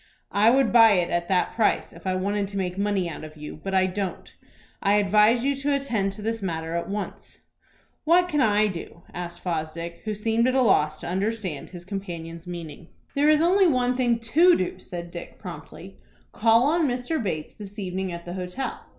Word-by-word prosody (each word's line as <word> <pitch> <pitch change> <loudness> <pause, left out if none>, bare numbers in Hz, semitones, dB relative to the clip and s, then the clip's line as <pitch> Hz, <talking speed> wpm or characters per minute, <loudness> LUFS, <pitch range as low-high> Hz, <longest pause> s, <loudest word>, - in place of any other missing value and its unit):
"I 210 +3 +5
would 265 0 +3
buy 225 -2 +8
it 180 -3 +1
at 175 0 0
that 185 -2 +1
price 225 - +1
if - - -10
I 185 - +1
wanted 200 +2 -1
to 200 0 -6
make 180 -2 -2
money 200 -2 0
out 160 - -7
of 155 0 -10
you; 150 0 -8
but 195 0 -2
I 190 0 +4
don't. 190 0 -4 0.5
I 200 +1 +3
advise 210 +4 +4
you 280 +1 +1
to 280 +1 0
attend 225 -8 -1
to 210 +1 -9
this 225 0 -2
matter 165 -3 -3
at 170 - -3
once." 205 +1 -5 0.7
"What 350 +3 +4
can 300 -5 +1
I 215 -3 +4
do?" 170 -3 -6
asked 175 -1 -6
Fosdick, 170 0 -4
who 215 -1 -3
seemed 225 +3 +1
at 255 - +1
a 265 - +4
loss 155 -8 +2
to - - -6
understand 190 -3 -2
his 175 -1 -10
companion's 175 -3 -6
meaning. 170 -2 -8 0.3
"There 290 +2 +3
is 305 0 +5
only 375 +2 +5
one 250 -4 +2
thing 245 -2 +2
to 325 +11 +4
do," 185 - -3
said 175 -1 -7
Dick, 170 - -8
promptly. 170 +2 -10 0.3
"Call 230 +2 +4
on 320 +1 +2
Mr. 250 +4 -1
Bates 155 -7 -3
this 205 0 -11
evening 190 -1 -3
at 170 0 -7
the 175 - -6
hotel. 185 +8 -4
200 Hz, 200 wpm, -25 LUFS, 175-235 Hz, 0.7 s, buy